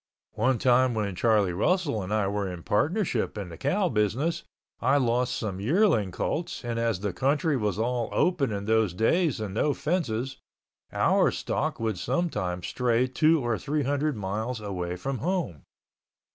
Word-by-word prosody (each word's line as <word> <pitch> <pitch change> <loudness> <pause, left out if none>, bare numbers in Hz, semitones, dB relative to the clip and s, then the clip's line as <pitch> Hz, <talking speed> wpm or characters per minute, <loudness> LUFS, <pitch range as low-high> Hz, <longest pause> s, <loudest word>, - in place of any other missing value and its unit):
One 130 -1 +1
time 125 0 +3
when 105 -3 -1
Charlie 105 -3 +2
Russell 145 - +1
and 95 +2 -6
I 105 -2 +2
were 100 -1 -2
in 85 -2 -8
partnership 150 - 0
in 100 -3 -5
the 85 - -8
cow 185 +8 +1
business, 120 - 0 0.4
I 135 +4 +3
lost 125 -1 +1
some 100 -4 -4
yearling 145 - +2
colts 155 - -3
and 115 -1 -2
as 115 -5 0
the 100 -3 -2
country 145 - +1
was 105 -7 -1
all 120 +1 -1
open 160 -9 +1
in 100 -1 -3
those 110 -4 +2
days 150 - +2
and 105 -3 -4
no 145 +7 +1
fences, 135 -6 -2 0.5
our - - +3
stock - - -2
would 110 -5 -2
sometimes 95 - -1
stray 125 -1 +1
two 155 +2 +2
or 115 -3 0
three 150 +1 -1
hundred 145 0 0
miles 110 +5 -3
away 90 -4 -4
from 130 +8 -4
home. 170 - -2
115 Hz, 165 wpm, -27 LUFS, 105-145 Hz, 0.5 s, time